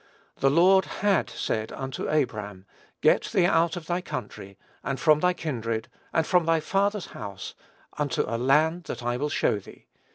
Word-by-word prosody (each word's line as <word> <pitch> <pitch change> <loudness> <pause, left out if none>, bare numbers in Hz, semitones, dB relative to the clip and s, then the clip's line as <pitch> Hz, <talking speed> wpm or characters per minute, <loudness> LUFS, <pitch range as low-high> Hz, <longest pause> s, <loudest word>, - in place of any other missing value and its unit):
"The 135 - +3
Lord 185 +6 +5 0.2
had 200 -3 +3
said 110 0 -3
unto 135 +1 -5
Abram, 105 -10 -2 0.4
Get - - +4
thee 180 - +2
out 165 -2 +2
of 175 -2 -7
thy 175 +2 -1
country, 100 - -7 0.3
and 135 -1 -3
from 150 +2 +4
thy 180 +2 +2
kindred, 115 -9 -3 0.2
and 160 - +1
from 175 -1 +2
thy 165 -1 +3
father's 200 +4 0
house, 100 -3 -7 0.5
unto 145 -3 0
a 115 - -4
land 155 +7 +2
that - - -6
I 120 0 0
will 145 +3 -1
show 105 - +1
thee." - - -15
150 Hz, 170 wpm, -26 LUFS, 120-175 Hz, 0.5 s, Lord